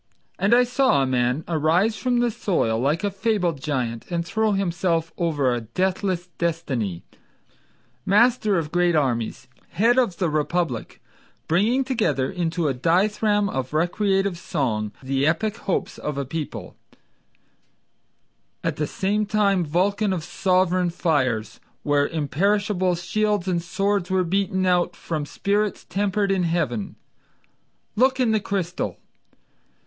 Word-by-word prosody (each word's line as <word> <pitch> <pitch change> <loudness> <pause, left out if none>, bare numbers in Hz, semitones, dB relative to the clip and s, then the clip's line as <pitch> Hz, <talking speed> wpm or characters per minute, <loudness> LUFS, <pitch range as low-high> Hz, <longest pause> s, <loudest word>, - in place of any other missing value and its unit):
And 205 +4 +4
I 250 - +6
saw 250 - +2
a - - +1
man 125 +3 0
arise 170 +7 +2
from 245 0 0
the 240 -1 +1
soil 115 - 0
like 145 - 0
a 205 - 0
fabled 190 -7 -1
giant 125 -6 -3
And 170 -1 -2
throw 220 +4 +1
himself 175 -3 0
over 145 -7 +1
a 120 - -2
deathless 185 - -1
destiny, 135 - -2 1.0
Master 215 - +3
of 155 -2 -2
great 175 -1 +2
armies, 120 -7 -1 0.3
head 230 +8 +4
of 195 -9 0
the 180 - +1
republic, 155 -3 -2 0.4
Bringing 215 +11 +2
together 215 - 0
into 170 -2 -1
a 140 - +1
dithyramb 205 - +2
of 130 -6 -4
recreative 195 +2 +1
song 115 - -2
The 135 +2 +1
epic 210 +7 0
hopes 195 - -3
of 150 -2 -4
a 140 - -2
people; 155 +3 -6 1.9
At - - -1
the 150 - -1
same 205 +5 -1
time 200 -4 +2
Vulcan 195 +6 +1
of 170 -4 -3
sovereign 185 -1 +1
fires, 130 - -1 0.2
Where 145 -1 +2
imperishable 185 +5 0
shields 210 +2 -1
and 175 -2 0
swords 195 +1 -1
were 185 0 +2
beaten 190 +1 0
out 180 -1 +2
From 155 -3 -4
spirits 200 +8 -1
tempered 200 0 0
in 190 -1 +1
heaven. 160 - -1 1.0
Look 260 +3 +3
in 245 -3 +3
the 220 - +2
crystal! 190 -4 -3
175 Hz, 135 wpm, -23 LUFS, 150-200 Hz, 1.9 s, I